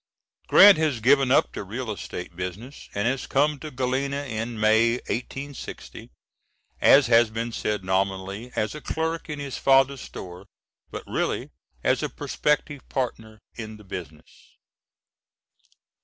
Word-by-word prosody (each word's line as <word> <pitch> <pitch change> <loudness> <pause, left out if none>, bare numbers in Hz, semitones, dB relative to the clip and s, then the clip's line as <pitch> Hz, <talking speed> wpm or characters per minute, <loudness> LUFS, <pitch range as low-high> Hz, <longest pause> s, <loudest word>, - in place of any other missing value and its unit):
[Grant 200 -5 +8
had 145 -8 0
given 135 +1 +5
up 135 - +4
the - - -5
real 110 +4 -5
estate 90 -3 -7
business 95 +10 -7
and 100 +2 0
had 130 0 -2
come 145 +1 +2
to 155 - -7
Galena 135 +2 -1
in 115 -2 -4
May, 110 +2 +4
1860, 135 +3 -6 0.7
as 140 0 +7
has 115 -1 +5
been 115 +2 -4
said, 105 -3 -2
nominally 95 +4 -2
as 110 - -1
a 150 - -8
clerk 160 +1 -3
in 150 - -4
his 140 -2 -5
father's 135 -1 +4
store, 90 +1 -9 0.4
but - - -7
really - - -2 0.3
as - - +2
a - - -2
prospective 150 -1 -1
partner 110 -4 -3 0.2
in 110 -2 -8
the 105 - -15
business. 90 -5 -10
120 Hz, 140 wpm, -25 LUFS, 105-140 Hz, 0.7 s, Grant